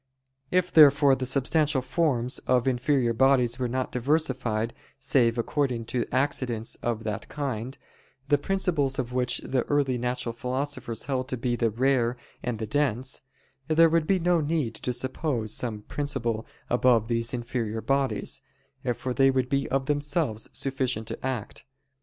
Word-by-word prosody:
If 180 0 +1
therefore 145 -2 +7
the 130 -1 -1
substantial 140 +1 +1
forms 130 -3 0
of 125 0 +3
inferior 125 -1 +2
bodies 130 0 +3
were 125 - 0
not 130 +2 -2
diversified 125 -5 0 0.2
save 120 -3 +2
according 125 -1 -1
to 120 -2 0
accidents 130 -4 0
of 115 -2 -2
that 110 -1 -4
kind, 130 -3 -4 0.5
the 145 0 +3
principles 160 -6 0
of 125 -1 -3
which 125 -1 0
the 130 -1 +1
early 140 -4 +1
natural 125 -1 -2
philosophers 125 -2 -3
held 130 -2 -1
to 130 - -3
be 120 0 -1
the 115 -1 +1
"rare" 125 +1 +1 0.2
and 120 -2 -3
the 110 - -3
"dense"; 130 0 0 0.5
there 165 +1 +5
would 165 -1 +1
be 195 - +3
no 175 -1 +2
need 145 -6 -1
to 125 - -3
suppose 125 -2 -2
some 110 -4 -3
principle 120 -6 -2 0.2
above 120 -2 +3
these 115 0 +1
inferior 120 -2 -3
bodies, 135 0 -1 0.5
for 125 +2 -3
they 135 +1 +4
would 130 -1 0
be 140 0 0
of 135 +1 0
themselves 145 -5 -1
sufficient 130 -5 -2
to - - -7
act. 125 -5 -4
130 Hz, 155 wpm, -27 LUFS, 120-140 Hz, 0.5 s, therefore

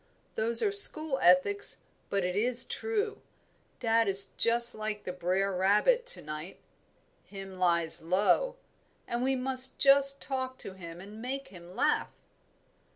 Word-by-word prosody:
Those 230 +1 0
are 410 - 0
school 315 -8 +6
ethics, 185 +3 +1 0.3
but 200 -1 -2
it 180 0 -4
is 240 +4 +2
true. 430 -1 -5 0.6
Dad 225 -2 0
is 195 0 +6
just 235 +1 +2
like 215 -1 -6
the 180 - -7
brere 185 +2 -3
rabbit 210 - 0
to - - 0
night, 155 +4 -9 0.7
'him 195 -2 -12
lies 170 -2 0
low,' 205 - -1 0.5
and 235 0 -4
we 265 +1 -1
must 260 0 +1
just 275 0 +3
talk 260 -1 -6
to 190 - -11
him 170 -2 -12
and 210 +3 -13
make 270 +3 -7
him 175 -1 -15
laugh." - - -1
215 Hz, 145 wpm, -27 LUFS, 185-265 Hz, 0.7 s, school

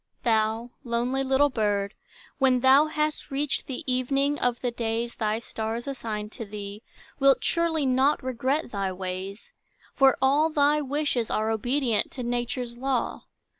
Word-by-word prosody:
Thou, 225 +1 +1
lonely 245 +2 0
little 270 +2 +3
bird, 205 -3 0 0.5
when 260 -2 +3
thou 270 +4 +6
Hast 305 0 -2
reached 280 +1 -1
the 265 +4 -5
evening 275 +3 +1
of 245 -1 0
the 245 - -1
days 235 0 -2
Thy 215 -1 -1
stars 225 +1 -4
assign 220 -6 -4
to 225 - -6
thee, 205 0 -7 0.4
Wilt 275 -1 +4
surely 335 -3 +1
not 265 +3 +2
regret 260 +3 -1
thy 195 -2 -1
ways; 185 +2 -6 0.4
For 270 -2 +5
all 285 +4 +3
thy 300 0 +3
wishes 280 -4 -1
are 220 +1 0
Obedient 240 0 0
to 255 - -5
Nature's 240 0 -2
law. 260 0 -2
250 Hz, 145 wpm, -26 LUFS, 225-275 Hz, 0.5 s, thou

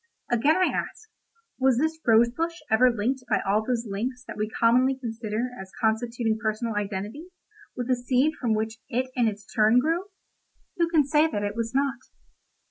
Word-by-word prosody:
Again 270 +7 +3
I 370 - +2
ask: 440 - -5 0.5
'Was 260 -2 +3
this 315 +4 0
rose 230 +1 +5
bush 330 +6 -2 0.2
ever 250 +3 +6
linked 245 +3 -1
by - - +3
all 210 +2 +2
those 240 0 -1
links 245 +6 -4
that - - -8
we 215 0 -2
commonly 250 +4 +3
consider 230 -1 -3
as 190 0 -11
constituting 225 0 0
personal 220 +1 -1
identity, 210 - -4 0.5
with 245 -1 -4
the 255 - +3
seed 255 +5 +1
from 230 -4 +1
which 220 +1 -3
it 255 +1 -1
in 240 -3 +3
its 210 -1 -4
turn 220 +2 +3
grew?' 325 +8 +1 0.7
Who 335 -1 +2
can 315 -4 +3
say 300 +2 +3
that 205 -10 -3
it 205 0 -2
was 230 +2 -3
not? 275 -1 +1
240 Hz, 180 wpm, -26 LUFS, 220-265 Hz, 0.7 s, ever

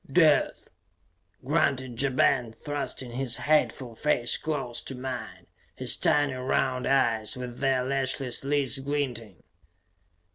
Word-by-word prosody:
"Death!" 155 -1 +3 0.8
grunted 130 -3 0
Ja 140 - +2
Ben, 125 -2 +2
thrusting 140 0 -4
his 125 0 0
hateful 140 -5 +1
face 120 -1 +1
close 135 -6 -3
to 135 - -6
mine, 125 -3 -6 0.3
his - - -1
tiny 145 -2 +2
round 130 0 -1
eyes, 115 -3 +1
with 125 -1 -7
their 135 -2 +1
lashless 135 -1 0
lids 140 -1 +2
glinting. 130 - -4
130 Hz, 115 wpm, -27 LUFS, 120-140 Hz, 0.8 s, Death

